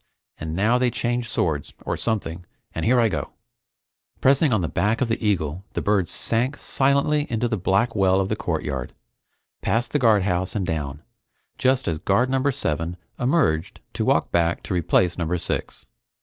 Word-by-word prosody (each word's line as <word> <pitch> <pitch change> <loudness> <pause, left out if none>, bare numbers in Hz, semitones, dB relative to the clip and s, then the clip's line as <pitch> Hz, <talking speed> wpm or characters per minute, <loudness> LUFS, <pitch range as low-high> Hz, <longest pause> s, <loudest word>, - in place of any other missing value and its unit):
Six - - -46 0.3
and 80 0 -4
now 110 +6 +3
they 125 -1 +3
change 120 0 -2
swords 75 -4 -1
or - - -1
something, 90 -6 -3 0.3
and 80 - -3
here 125 +2 +4
I 115 - +4
go!" 105 - -4 0.9
Pressing 140 +2 +4
on 110 -5 +2
the 85 - -1
back 105 +7 0
of 130 - 0
the 115 0 -1
eagle 90 -4 0
the - - -2
bird 100 -4 +1
sank 125 +5 0
silently 140 +2 +1
into 115 +1 0
the 115 - -1
black 100 +5 +1
well 95 -2 +3
of 95 - 0
the - - -1
courtyard, - - -3 0.7
past 120 +1 0
the 145 - +1
guardhouse 95 -6 +2
and 100 -3 0
down, 75 -2 -3 0.6
just 130 0 +2
as 80 -2 -1
Guard 120 +9 +2
Number 135 +1 +2
Seven 80 - -2 0.2
emerged 125 - +1
to - - -1
walk - - +2
back 85 0 +1
to - - -4
replace 90 +1 +2
Number 85 +1 0
Six. - - -4
105 Hz, 180 wpm, -23 LUFS, 85-125 Hz, 0.9 s, here